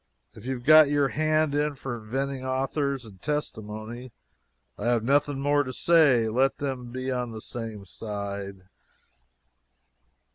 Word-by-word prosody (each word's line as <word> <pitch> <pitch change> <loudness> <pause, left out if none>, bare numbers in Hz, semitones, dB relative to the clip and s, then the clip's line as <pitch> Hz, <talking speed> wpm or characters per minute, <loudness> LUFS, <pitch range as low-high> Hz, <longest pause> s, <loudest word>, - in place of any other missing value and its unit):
If 105 - -13
you 130 - 0
have 120 - -9
got 155 -1 +8
your 145 -2 +2
hand 155 0 +1
in 145 0 0
for 135 -2 -5
inventing 130 +4 -3
authors 135 0 -1
and 95 -4 -14
testimony, 120 -4 -4 0.6
I 105 - -4
have 120 -2 +2
nothing 140 +2 +2
more 145 +1 +3
to 130 - -5
say 140 -7 +4
let 130 +5 +2
them 130 -4 -4
be 130 +1 -3
on 125 -1 -2
the 110 -1 -7
same 110 -3 -7
side." 100 -2 -6
130 Hz, 145 wpm, -27 LUFS, 110-145 Hz, 0.6 s, got